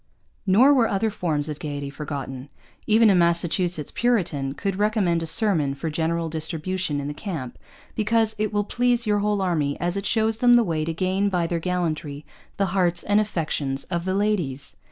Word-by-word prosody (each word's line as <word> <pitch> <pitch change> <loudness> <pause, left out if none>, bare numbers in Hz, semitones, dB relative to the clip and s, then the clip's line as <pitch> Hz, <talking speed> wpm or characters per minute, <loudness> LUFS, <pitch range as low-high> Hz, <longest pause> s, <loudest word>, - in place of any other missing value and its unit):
Nor 240 +10 +6
were 245 -5 +3
other 210 +3 0
forms 155 -7 -2
of 150 -1 -5
gaiety 145 -2 -5
forgotten. 140 -2 -6 0.4
Even 220 0 +5
a - - +4
Massachusetts 170 -2 +1
Puritan 170 - 0
could 195 -2 -3
recommend 205 -5 +1
a 165 - -3
sermon 160 -8 +4
for 160 +3 -4
general 165 +1 -1
distribution 160 0 -2
in 140 - -4
the 145 - -4
camp 145 - -6 0.4
because 220 0 +1
'It 215 -1 0
will 205 -1 0
please 245 +2 0
your 210 -1 +1
whole 205 -1 0
army, 155 -6 -1
as 175 +1 -1
it 200 0 -2
shows 220 -1 +1
them 245 +1 +5
the 240 - +5
way 160 -6 -1
to 165 - -2
gain 190 +3 0
by 180 -3 0
their 170 0 -2
gallantry 160 -5 -3 0.3
the 195 - +2
hearts 175 -3 +1
and 205 +1 +2
affections 150 -9 -2
of 170 0 -2
the 185 0 -1
Ladys.' 180 -10 -2
175 Hz, 185 wpm, -23 LUFS, 155-210 Hz, 0.4 s, Nor